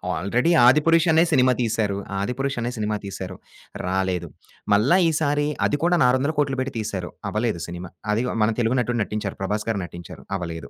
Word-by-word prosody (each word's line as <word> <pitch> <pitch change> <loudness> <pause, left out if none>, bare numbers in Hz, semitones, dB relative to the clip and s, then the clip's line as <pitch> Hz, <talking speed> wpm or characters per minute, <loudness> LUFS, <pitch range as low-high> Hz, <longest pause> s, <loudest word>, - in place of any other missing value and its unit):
Already 120 - +1
'Adipurush' 155 +6 +5
అనే 160 +1 +5
cinema 130 -2 +4
తీశారు. 110 -3 0 0.2
'ఆదిపురుష్' 125 +7 -2
అనే 120 - -2
సినిమా 105 0 -1
తీశారు. 95 -1 -6 0.5
రాలేదు. 95 -2 -1 0.5
మళ్ళా 120 - +4
ఈసారి 145 -2 +1 0.2
అది 145 - 0
కూడా 175 +1 +3
6000000000 140 +1 +1
పెట్టి 130 +1 -2
తీసారు. 95 -4 -4 0.2
అవ్వలేదు 105 -5 -1
సినిమా. 90 +1 -7 0.2
అది 115 +4 0 0.2
మన 105 - +3
తెలుగు 120 +2 +1
నటుడు 120 0 -1
నటించారు 105 -1 -4
'ప్రభాస్' 105 +3 -2
గారు 100 -4 -1
నటించారు 85 -1 -11
అవ్వలేదు. 85 -2 -6
115 Hz, 155 wpm, -23 LUFS, 95-135 Hz, 0.5 s, ఆదిపురుష్